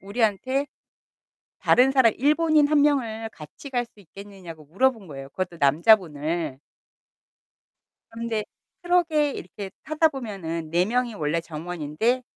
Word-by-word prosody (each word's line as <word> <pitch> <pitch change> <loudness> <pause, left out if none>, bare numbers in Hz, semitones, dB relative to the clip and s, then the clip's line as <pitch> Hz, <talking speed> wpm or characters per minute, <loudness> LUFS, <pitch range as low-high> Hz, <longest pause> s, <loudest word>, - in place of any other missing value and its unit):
우리한테 230 +7 0 0.9
다른 255 +2 +4
사람 260 -4 +4
일본인 305 +2 +3
1 295 -1 +4
명을 230 -7 0
같이 160 - -12
갈 245 -2 0
수 220 -2 -22
있겠느냐고 185 -4 -12
물어본 220 - 0
거예요 135 -3 -9
그것도 185 +2 -4
남자분을. 155 -2 +2 1.5
그런데 225 -2 -3 0.4
트럭에 335 -4 +2
이렇게 190 +1 -8
타다 310 +1 +2
보면은 190 - -5
4 175 +2 +3
명이 240 +2 -1
원래 160 -1 -1
정원인데 170 - -2
215 Hz, 275 characters per minute, -24 LUFS, 165-265 Hz, 1.5 s, 다른